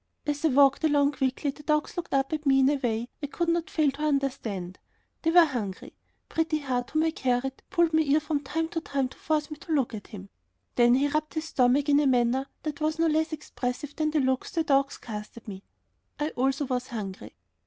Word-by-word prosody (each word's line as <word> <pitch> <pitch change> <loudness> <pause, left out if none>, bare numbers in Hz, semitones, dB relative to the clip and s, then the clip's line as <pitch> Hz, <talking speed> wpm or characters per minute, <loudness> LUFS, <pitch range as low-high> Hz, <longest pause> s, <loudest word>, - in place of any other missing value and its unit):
As 290 0 -2
I - - +5
walked 275 +1 +4
along 290 -2 +3
quickly 270 +1 -1
the 295 - -14
dogs 300 0 0
looked 350 - -5
up 270 +2 +1
at 305 -1 -3
me 270 0 +5
in 265 - +5
a - - +2
way 235 -2 -1
I 285 - -2
could 340 +4 -1
not 335 0 0
fail 305 -3 +2
to 280 +2 -10
understand. 255 -11 -2 0.4
They 325 - +1
were 345 0 +7
hungry. 220 -10 -5 0.3
Pretty 320 -1 0
Heart, 255 -4 -2
whom 310 +1 +1
I 320 - +2
carried, 265 -2 -1
pulled 340 -2 +2
my 315 - +5
ear 295 0 +3
from 300 -1 -1
time 320 +4 -2
to 330 - -3
time 275 -4 -1
to - - -15
force 310 0 -1
me 305 - -6
to 325 - -9
look 265 -6 +1
at 210 -2 -7
him. 195 -2 -10 0.4
Then 240 0 +5
he 275 +2 +2
rubbed 305 +2 -2
his 315 0 -2
stomach 270 -1 +2
in 290 0 +5
a 295 - +3
manner 255 +1 +2 0.2
that 305 -1 -4
was 310 +1 0
no 330 - +2
less 315 0 +1
expressive 285 -2 -4
than 310 -1 0
the 310 0 +1
looks 260 0 0
the 330 - 0
dogs 275 -2 +2
cast 210 -1 -8
at 230 - -12
me. 195 -2 -7 0.6
I 295 +1 0
also 270 +1 0
was 255 -1 -2
hungry. 205 -6 -7
280 Hz, 230 wpm, -27 LUFS, 255-310 Hz, 0.6 s, were